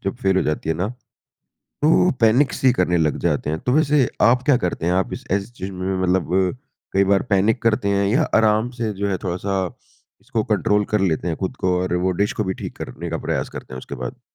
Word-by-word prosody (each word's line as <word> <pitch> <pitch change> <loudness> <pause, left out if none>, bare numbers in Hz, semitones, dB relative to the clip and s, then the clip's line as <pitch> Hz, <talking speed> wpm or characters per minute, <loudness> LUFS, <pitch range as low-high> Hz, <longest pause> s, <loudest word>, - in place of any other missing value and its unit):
जब 95 - -2
फेल 95 -3 +2
हो - - +3
जाती 75 +1 -2
है 80 - +2
ना, 90 +5 -2 0.9
तो 165 +4 +4
पैनिक-सी 125 +3 +4
करने 90 -7 +1
लग 80 -2 +1
जाते - - 0
हैं, 80 +1 -2
तो 125 - -1
वैसे 145 -3 +3
आप 125 +3 +4
क्या 145 -4 +5
करते 90 -7 -2
हैं? 90 - +2
आप 95 0 0
इस - - -6
ऐसी 100 +3 -1
चीज़ 100 -5 -7
में 95 +1 -3
मतलब 95 -1 +1 0.6
कई 100 +1 +4
बार 95 - +3
पैनिक 110 +5 +2
करते 110 -3 +2
हैं 100 0 +2
या 125 +10 +2
आराम 110 +1 +3
से 115 -2 -1
जो 100 +1 -2
है 95 - 0
थोड़ा-सा 95 +2 -2 0.6
इसको - - -2
कंट्रोल 105 0 +1
कर 105 0 0
लेते 90 -2 0
हैं 80 - -2
खुद 95 - -3
को 90 -1 +1
और 90 -1 -2
वो 95 - +2
डिश 105 - +1
को 110 - +2
भी 95 - -2
ठीक - - -7
करने 85 +2 -6
का 80 - -2
प्रयास - - -2
करते - - -9
हैं 65 - -5
उसके 70 - -8
बाद? 65 -1 -6
95 Hz, 230 wpm, -21 LUFS, 90-110 Hz, 0.9 s, क्या